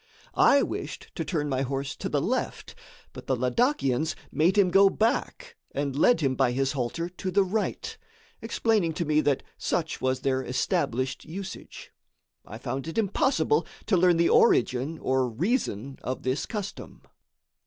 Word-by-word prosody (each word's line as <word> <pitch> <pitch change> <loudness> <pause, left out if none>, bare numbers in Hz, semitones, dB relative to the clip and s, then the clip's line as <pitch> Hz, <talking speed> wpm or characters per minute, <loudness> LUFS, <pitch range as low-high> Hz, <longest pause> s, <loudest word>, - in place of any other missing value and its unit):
I 280 - +5
wished - - -6
to - - -3
turn 150 -5 -2
my 130 -2 -1
horse 135 +1 -3
to - - -4
the - - +1
left, - - -2 0.4
but - - -10
the 130 - +2
Ladakians 145 - +1 0.2
made 175 +6 +2
him 190 -3 +4
go 195 +1 +6
back 280 - -1 0.2
and 140 -1 -2
led 240 - +4
him 135 -3 +2
by 130 -2 +1
his 135 +1 0
halter 140 +5 -2
to 185 +1 -5
the 195 +2 +3
right, 205 +3 -2 0.5
explaining 220 -6 +1
to 170 - -2
me 155 0 +3
that 145 -3 +1 0.2
such 165 -3 -2
was 130 0 0
their 130 -1 0
established 130 0 -1
usage. 190 +4 -8 0.6
I - - -8
found 135 +3 -4
it 165 - -6
impossible 195 - +1 0.2
to 210 - +2
learn 175 -1 +4
the 170 0 +3
origin 130 +6 +3
or 130 -3 0
reason 135 - -2
of 130 - -4
this 130 +2 -1
custom. 205 -3 -6
155 Hz, 160 wpm, -27 LUFS, 130-195 Hz, 0.6 s, go